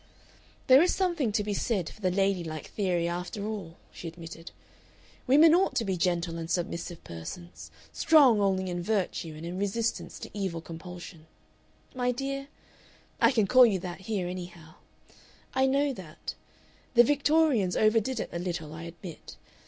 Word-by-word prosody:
"There 260 +2 +8
is 355 - +3
something 345 - 0
to 210 0 0
be 205 0 -2
said 195 -4 -1
for 215 - -11
the 185 - +2
lady 195 -1 +1
like 155 -2 -6
theory 180 -4 0
after 180 +4 -4
all," 200 -6 -5
she 170 - -8
admitted. 165 0 -9 0.8
"Women 305 +5 +7
ought 370 +3 +3
to 230 - +1
be 190 -2 0
gentle 170 -1 0
and 165 0 -6
submissive 170 -1 -3
persons, 130 - -9 0.2
strong 270 -10 +5
only 190 -1 +1
in 175 0 -3
virtue 180 -5 -2
and 160 - -8
in 175 +2 -5
resistance 220 +3 -2
to - - -9
evil 190 -5 -3
compulsion. 170 0 -10 0.7
My 250 -1 0
dear 275 +2 -4 0.7
I - - +6
can 225 -6 +2
call 255 +4 +7
you 200 -4 +1
that 180 -1 -6
here, 190 -3 -2
anyhow 175 -3 -8 0.8
I 265 0 +3
know 280 +1 +2
that. 180 -9 -8 0.6
The 240 - +9
Victorians 290 - +2
over 215 +1 +4
did 255 +2 -3
it - - -3
a 170 - -2
little, 170 -4 -4
I 165 +1 -7
admit. 170 0 -10
190 Hz, 165 wpm, -28 LUFS, 170-240 Hz, 0.8 s, The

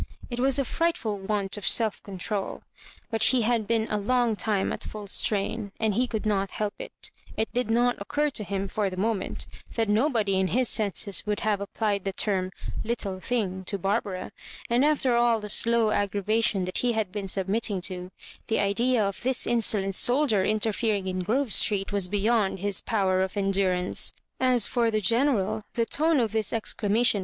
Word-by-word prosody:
It 240 - -3
was 270 +1 +3
a 275 - +1
fright 335 +6 0
ful 210 -3 -3
want 200 0 -2
of 205 - -4
self 220 -3 +3
control; 200 +1 -4 0.5
but 225 -1 -1
he 245 +1 +4
had 225 -2 +1
been 225 -1 +1
a 210 - -1
long 240 +1 +1
time 205 -2 0
at - - -6
full 210 -1 -7
strain, 200 +1 -2
and 220 -2 +1
he 250 +5 +1
could 220 -2 -3
not 200 -2 +1
help 210 -1 -3
it - - -8 0.3
It 220 - -1
did 245 -2 -1
not 245 +2 +2
occur 295 +8 0
to 220 - -2
him, 195 0 -3
for 200 +1 -1
the 185 - -8
moment, 215 -1 -1 0.3
that 225 -1 +1
nobody 215 -3 +2
in 190 - +2
his 250 +5 +1
senses 200 -3 -1
would 210 -1 -1
have 210 -2 0
applied 200 -1 -1
the 195 - -3
term 185 -2 0 0.2
" - - -5
little 205 -5 -3
thing 190 -4 -2
" - - -21
to 200 - -1
Barbara; 195 -1 -2 0.4
and, 240 +3 +4
ajter 285 -5 +2
all 235 -1 +3
the 210 0 -7
slow 230 +1 +3
aggra 205 -1 0
vation 215 -2 +1
that 185 - -3
he 245 -1 +1
had 215 -4 -1
been 200 -1 -4
submitting 195 +2 0
to, 180 0 -3 0.4
the 225 - +1
idea 225 +3 +2
of 195 -1 -4
this 255 +1 +1
insolent 210 -4 +2
soldier 245 -2 +3
interfering 215 -1 +1
in 185 0 -2
Grove 225 +6 0
Street 200 -1 +1
was 200 -3 +2
beyond 205 +1 +1
his 200 0 0
power 190 -4 +1
of 190 +2 -2
endurance. 190 -2 +2 0.2
As 250 -4 +3
for 240 -2 +1
the 215 - 0
GenersJ, 220 -1 +1
the 230 - +1
tone" 310 +5 +2
of 225 -4 +1
this 220 -1 0
exclamation 225 0 +1
215 Hz, 195 wpm, -26 LUFS, 195-235 Hz, 0.5 s, he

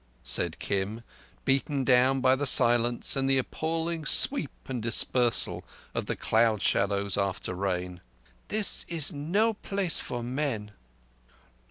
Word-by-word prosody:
said - - 0
Kim, 100 +4 -3 0.4
beaten 135 +1 0
down 130 +1 +3
by 130 0 +4
the 145 +1 -2
silence 120 -1 +4
and 135 0 0
the 135 - +3
appalling 160 +4 -3
sweep 165 - +3 0.2
and 125 -3 -4
dispersal 120 +1 +2 0.3
of - - -4
the - - -2
cloud 110 -1 +1
shadows 100 0 0
after 100 -1 -2
rain. 90 -1 -4 0.5
"This 215 -1 0
is 160 -4 0
no 190 +11 0
place 195 -4 -1
for 120 -1 -5
men!" 120 -5 -3
130 Hz, 130 wpm, -27 LUFS, 110-150 Hz, 0.5 s, by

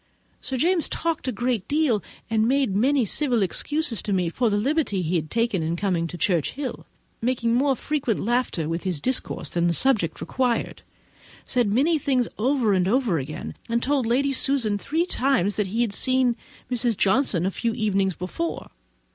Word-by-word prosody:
Sir 265 - -3
James 340 +4 +2
talked 330 -4 -2
a - - +1
great 240 -2 -1
deal, 285 -8 +2 0.3
and 220 0 +2
made 265 -6 +1
many 260 +4 +3
civil 245 -1 +2
excuses 290 - -1
to 210 - -4
me 180 -3 +1
for 235 +7 0
the 205 - +1
liberty 250 - 0
he 170 +2 -1
had 155 -2 -1
taken 230 -4 0
in 160 +1 -1
coming 175 -3 0
to 175 - -7
Churchhill—mixing 235 - -2
more 270 +2 +3
frequent 275 -6 -1
laughter 235 -8 0
with 165 +1 -2
his 180 -6 -2
discourse 255 - -2
than 175 0 +1
the 170 - +2
subject 215 -11 +1
required—said 245 -2 -3
many 300 +8 +3
things 255 -4 +1
over 245 -3 +2
and 185 -1 +2
over 225 - +2
again, 145 +3 -6 0.2
and 235 +1 0
told 275 -3 +1
Lady 275 +4 +2
Susan 255 -7 +1
three 320 - 0
times 255 - +1
that 210 -2 0
he 220 +5 -1
had 230 -4 0
seen 255 +1 +2 0.4
Mrs. 240 -3 0
Johnson 195 -4 +2
a 190 - 0
few 230 +3 -2
evenings 195 -5 +1
before. 260 - -4
235 Hz, 170 wpm, -24 LUFS, 195-265 Hz, 0.4 s, many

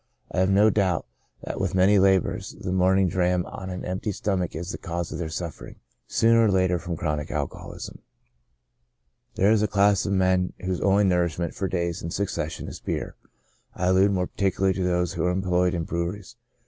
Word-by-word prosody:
I - - -1
have 95 +1 +3
no 105 +3 +5
doubt 95 -5 +1 0.4
that - - -4
with - - -1
many 95 +2 +5
laborers, 95 -1 +1
the 90 - -4
morning 95 +1 +3
dram 90 0 +1
on 95 -1 -7
an 90 0 -5
empty 95 +3 -2
stomach 95 -2 -2
is 85 +3 -4
the - - -6
cause 85 -2 -4
of - - -5
their 80 -2 -3
suffering, 85 +1 -6 0.3
sooner 115 0 +4
or - - +3
later, 95 -2 +2
from 85 -1 -5
chronic 75 -2 -2
alcoholism. - - -5 1.4
There 100 +3 +3
is 110 -2 +3
a 105 - +2
class 100 -1 +3
of 100 - 0
men 95 -1 +2
whose 95 -1 -2
only 100 +1 +3
nourishment 85 -3 0
for 95 - -2
days 85 -2 -2
in 85 - -4
succession 100 +3 -3
is - - -8
beer; - - -4 0.6
I 90 0 0
allude 95 +2 +4
more 90 -2 0
particularly 95 0 0
to 95 - -2
those 90 -1 0
v^^ho 85 - -1
are - - +2
employed 90 -1 +1
in 85 - -1
breweries. 85 +6 -4
95 Hz, 190 wpm, -25 LUFS, 90-95 Hz, 1.4 s, no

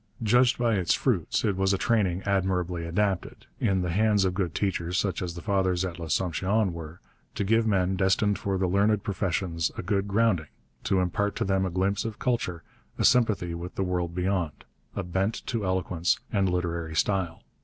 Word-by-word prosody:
Judged 120 +3 +4
by 120 -2 +2
its 90 -3 +2
fruits, 105 - 0
it 100 -3 +1
was 95 +1 +2
a - - +2
training 95 -5 +1
admirably 90 -3 0
adapted, 95 +2 -1
in 95 -2 +1
the 90 - -1
hands 105 +1 +3
of 95 - 0
good 90 -4 -2
teachers 90 -3 -1
such 95 -3 0
as 90 -2 -4
the 85 - -8
fathers 95 -3 +1
at 90 -1 -6
L'Assomption 95 +5 0
were, 80 0 -8 0.4
to - - -1
give 115 +3 +2
men 95 -2 +2
destined 95 +2 +2
for 100 -1 -1
the 95 - +1
learned 100 +3 +2
professions 90 -5 -1
a - - -4
good 100 +1 0
grounding, 100 -6 +2 0.4
to 95 -1 +2
impart 100 +3 -1
to - - -1
them 95 -1 +1
a - - -2
glimpse 95 +3 0
of 110 -2 -5
culture, 115 -10 -1 0.3
a - - +1
sympathy 105 -8 +3
with 85 +2 -6
the 95 - 0
world 90 -2 -2
beyond, 90 -4 -1 0.3
a - - -2
bent 95 +5 -2
to 115 -4 -2
eloquence 90 -2 0
and 100 -3 +2
literary 85 -2 -2
style. 90 -1 0
95 Hz, 185 wpm, -27 LUFS, 90-100 Hz, 0.4 s, Judged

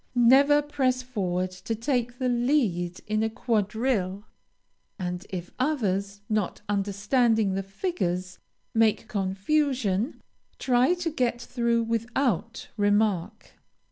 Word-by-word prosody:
Never 275 +5 +6
press 260 -3 0
forward 185 -7 -2
to 185 +5 -4
take 245 0 -1
the 255 - -1
lead 235 - +1
in 215 0 0
a 220 - +1
quadrille, 215 -3 -1 0.7
and 180 0 -4
if 180 -2 -6
others, 200 -8 -1
not 215 -3 -1
understanding 205 +2 +1
the 195 - -1
figures, 185 - -3 0.3
make 225 0 +2
confusion, 215 +3 0 0.4
try 255 +6 +3
to 350 -2 -3
get 245 -5 0
through 235 -1 0
without 230 - -1
remark. 205 -1 +1
225 Hz, 110 wpm, -26 LUFS, 195-255 Hz, 0.7 s, Never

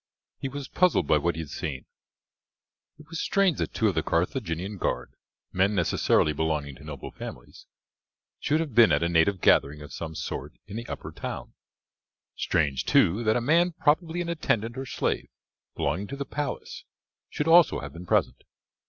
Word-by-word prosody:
He 135 - -3
was 140 0 -6
puzzled 180 - +2
by 75 +1 +3
what 85 +3 0
he 80 - -3
had 75 - -8
seen. 70 -4 -4 1.1
It 150 - -15
was 165 0 -4
strange 195 -6 +2
that - - -1
two - - +2
of - - +2
the - - +1
Carthaginian 90 +6 -1
guard, - - -2 0.4
men 95 +3 +2
necessarily 85 -3 +2
belonging 75 -2 -1
to - - -14
noble 75 -4 -7
families, - - -10 0.7
should 155 +2 +1
have 155 -6 -4
been 115 -2 +7
at 75 +2 +3
a - - +2
native 85 +2 +2
gathering 75 +2 +3
of 75 - -11
some 80 -1 -6
sort 75 +2 -5
in 100 - -9
the 115 +1 -5
upper - - -6
town. - - -6 0.8
Strange, 70 -5 0
too, 100 +8 +3
that 110 +1 +3
a - - -1
man 170 +7 +3
probably 160 +2 +1
an 170 - -3
attendant 115 -8 0
or 135 0 -5
slave - - -2 0.5
belonging 90 +9 -1
to 140 - -6
the 140 - -3
palace 145 +1 -5 0.5
should 150 - -2
also 170 0 +6
have - - -8
been 85 +2 -10
present. - - +1
100 Hz, 180 wpm, -27 LUFS, -, 1.1 s, been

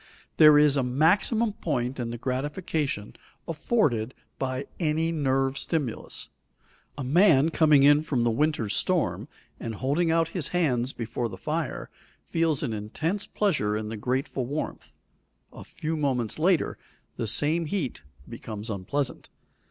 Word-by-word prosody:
There 150 -1 +8
is 150 -1 +5
a - - +3
maximum 190 - +2
point 130 -9 -2
in 120 -1 -2
the 120 - -5
gratification 140 - -3 0.3
afforded 150 - 0 0.2
by 130 0 -2
any 160 0 +1
nerve 135 -3 0
stimulus. 145 -9 -3 0.7
A 140 - -3
man 155 +1 +5
coming 155 -4 +4
in 145 +1 +6
from 135 -6 -1
the 120 - +2
winter's 120 -5 0
storm 110 - 0 0.3
and 115 -1 -5
holding 145 - 0
out 165 0 +2
his 170 -5 -2
hands 135 -8 0
before 115 0 -3
the 95 - -8
fire, - - -3 0.3
feels 165 -4 0
an 120 -6 -2
intense 155 - -3
pleasure 125 - 0
in 105 0 -4
the 110 - -4
grateful 130 +2 -2
warmth; 145 +4 -5 0.6
a - - -10
few 160 +1 -4
moments 130 -5 -1
later, 175 0 +2 0.4
the 115 - -2
same 155 +8 +2
heat 150 - -3 0.3
becomes 110 0 -6
unpleasant. 125 +8 -3
140 Hz, 140 wpm, -26 LUFS, 120-160 Hz, 0.7 s, There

